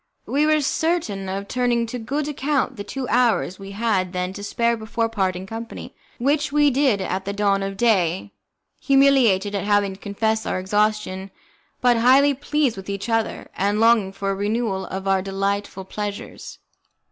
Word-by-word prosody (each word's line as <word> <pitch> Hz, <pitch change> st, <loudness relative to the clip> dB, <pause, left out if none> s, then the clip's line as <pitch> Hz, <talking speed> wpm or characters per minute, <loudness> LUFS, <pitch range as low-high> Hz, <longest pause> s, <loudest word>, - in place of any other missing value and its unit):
We 295 Hz, +2 st, +1 dB
were 310 Hz, -1 st, +3 dB
certain 280 Hz, -, -1 dB
of 195 Hz, +1 st, -4 dB
turning 245 Hz, -1 st, +1 dB
to 245 Hz, +2 st, -5 dB
good 280 Hz, +6 st, -2 dB
account 280 Hz, -2 st, -1 dB
the 205 Hz, -, -6 dB
two 255 Hz, +5 st, -5 dB
hours 235 Hz, -6 st, +2 dB
we 195 Hz, 0 st, -9 dB
had 200 Hz, -4 st, 0 dB
then 180 Hz, 0 st, -2 dB
to 200 Hz, -, -8 dB
spare 235 Hz, +3 st, +1 dB
before 225 Hz, +1 st, -2 dB
parting 190 Hz, -4 st, -1 dB
company, 225 Hz, +3 st, -8 dB, 0.2 s
which 285 Hz, +4 st, +1 dB
we 295 Hz, 0 st, +4 dB
did 260 Hz, -6 st, +2 dB
at 190 Hz, 0 st, -2 dB
the 200 Hz, -, -3 dB
dawn 200 Hz, -1 st, +1 dB
of 195 Hz, 0 st, -4 dB
day, 195 Hz, -5 st, +1 dB, 0.5 s
humiliated 265 Hz, -8 st, +4 dB
at 200 Hz, 0 st, -2 dB
having 205 Hz, -1 st, +2 dB
to 190 Hz, -, -14 dB
confess 220 Hz, +2 st, -1 dB
our -, -, -1 dB
exhaustion, 205 Hz, -1 st, 0 dB, 0.5 s
but 245 Hz, -1 st, +4 dB
highly 265 Hz, +5 st, +5 dB
pleased 280 Hz, -3 st, 0 dB
with 195 Hz, +1 st, -8 dB
each 200 Hz, +3 st, -4 dB
other, 225 Hz, -1 st, -1 dB
and 205 Hz, +2 st, 0 dB
longing 225 Hz, -4 st, +4 dB
for 195 Hz, 0 st, -3 dB
a -, -, -2 dB
renewal 205 Hz, -1 st, -1 dB
of 190 Hz, +1 st, -5 dB
our 195 Hz, -1 st, +3 dB
delightful 195 Hz, 0 st, -3 dB
pleasures. 205 Hz, +1 st, -6 dB
210 Hz, 170 wpm, -22 LUFS, 195-245 Hz, 0.5 s, highly